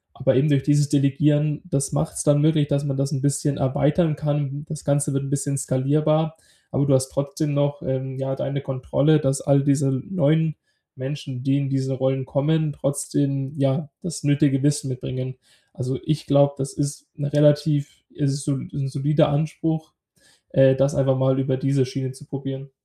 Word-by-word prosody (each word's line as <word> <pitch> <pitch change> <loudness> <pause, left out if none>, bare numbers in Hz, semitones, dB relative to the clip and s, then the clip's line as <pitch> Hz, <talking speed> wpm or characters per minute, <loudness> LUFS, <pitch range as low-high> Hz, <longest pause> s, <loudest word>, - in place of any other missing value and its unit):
Aber 135 -1 +1
eben 145 +4 +3
durch 140 -2 +2
dieses 145 -1 +2
Delegieren, 145 +1 +2
das 140 -5 -1
macht's 145 +2 -2
dann 145 -1 +4
möglich, 155 -2 +3
dass 140 0 0
man 135 -1 -2
das 140 +2 -1
'n 135 -3 -2
bisschen 145 0 0
erweitern 145 +4 +1
kann. 145 0 -2
Das 155 -3 -7
Ganze 145 0 +1
wird 135 0 -1
'n 135 - -5
bisschen 140 -1 -1
skalierbar, 155 +5 +1 0.3
aber 140 +2 +1
du 135 - +4
hast 130 0 +1
trotzdem 140 +2 -2
noch 145 0 0
ähm, 130 0 -3
ja, 135 0 -2
deine 140 +1 -3
Kontrolle, 140 +3 +1
dass 135 -1 0
all 140 -1 +3
diese 140 -1 +2 0.2
neuen 160 -3 +2 0.4
Menschen, 135 -1 -6
die 135 0 +2
in 140 -1 -1
diese 135 0 -1
Rollen 130 0 0
kommen, 150 +2 0
trotzdem, 140 0 -1
ja, 140 +2 0
das 170 -6 -6
nötige 145 -1 +2
Wissen 145 -1 +1
mitbringen. 130 0 -5 0.4
Also 130 +1 -3
ich 155 0 -1
glaub, 140 0 +3
das 135 +1 -4
ist 145 - -4
'ne 145 -2 -3
relativ 150 0 +2 0.2
es 140 -2 0
ist 140 0 -4
sol 140 -3 -2
'n 140 -1 -3
solider 150 +2 +2
Anspruch, 155 +1 -2 0.6
äh, 135 0 +5
das 135 +2 +1
einfach 135 -1 +2
mal 130 0 +2
über 135 -1 0
diese 135 -1 +1
Schiene 130 0 -4
zu 135 +3 -13
probieren. 135 -1 -6
140 Hz, 180 wpm, -23 LUFS, 135-150 Hz, 0.6 s, äh